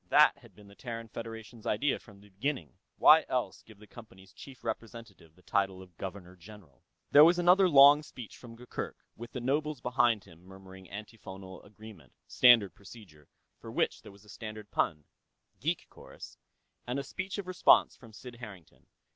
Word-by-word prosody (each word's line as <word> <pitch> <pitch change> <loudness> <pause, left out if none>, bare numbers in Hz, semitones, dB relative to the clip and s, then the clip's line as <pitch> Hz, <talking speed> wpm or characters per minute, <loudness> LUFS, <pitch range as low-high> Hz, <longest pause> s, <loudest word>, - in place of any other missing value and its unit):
That - - +5
had - - -19
been 105 -1 -17
the 100 - -16
Terran 115 0 -8
Federation's 115 0 -9
idea, 140 +7 0
from 105 -3 -17
the 105 - -19
beginning; 100 - -4 0.2
why - - +7
else - - -2
give 110 -2 -17
the 105 - -16
Company's 95 -5 -15
chief 135 -3 -13
representative 110 -7 -8
the 90 - -24
title 95 -2 -1
of 90 -2 -15
Governor 90 0 -8
General? 95 -4 -16 0.3
There 145 - +9
was 170 +2 +5
another 180 +2 +5
long 145 0 +8
speech 125 -6 -11
from 115 -2 -13
Gurgurk, 125 +1 -7 0.2
with 120 +1 -10
the 125 - -4
nobles 145 +3 -1
behind 120 -3 +1
him 85 -3 -18
murmuring 95 0 -14
antiphonal 95 -3 -10
agreement 105 -3 -15
standard 115 -8 +5
procedure, 95 -8 -15 0.3
for - - -10
which - - -1
there - - -13
was 100 +1 -19
a - - -19
standard 110 0 -9
pun, 75 -3 -1 0.6
geek - - -2
chorus - - -13 0.5
and 125 +2 -2
a 140 - -3
speech 195 +8 -6
of 200 - -5
response 185 0 +4
from 115 -3 -16
Sid 120 +2 -12
Harrington. 100 -8 -13
110 Hz, 175 wpm, -30 LUFS, 95-125 Hz, 0.6 s, There